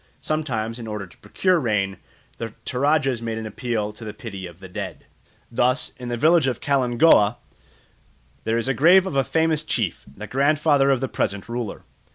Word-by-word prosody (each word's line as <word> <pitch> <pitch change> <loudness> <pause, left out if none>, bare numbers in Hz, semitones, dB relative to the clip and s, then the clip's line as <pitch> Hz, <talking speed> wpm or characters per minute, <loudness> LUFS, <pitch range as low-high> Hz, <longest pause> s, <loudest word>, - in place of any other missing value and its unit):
Sometimes, 120 -7 -2
in 115 - -7
order 105 -2 -4
to 90 - -19
procure 185 -2 +1
rain, 105 -7 0 0.4
the 115 -1 -5
Toradjas 135 -2 +1
make 115 -1 -3
an 110 - -5
appeal 110 -1 -3
to 110 - -12
the 105 -1 -7
pity 100 -6 -7
of 85 0 -14
the 95 - -10
dead. 90 - -6 0.5
Thus, 125 +4 +1
in 125 -1 -7
the 120 - -2
village 160 +2 +4
of 130 - -1
Kalingooa, 125 -4 +4 1.1
there 115 +1 0
is 115 - -1
the 135 - +1
grave 180 +7 +6
of 190 - -4
a 135 - +3
famous 160 +1 +1
chief, 115 - -2
the 105 - -6
grandfather 145 +2 +3
of 135 -2 +2
the 135 - 0
present 100 -5 -2
ruler. 120 -2 -5
120 Hz, 185 wpm, -23 LUFS, 110-145 Hz, 1.1 s, grave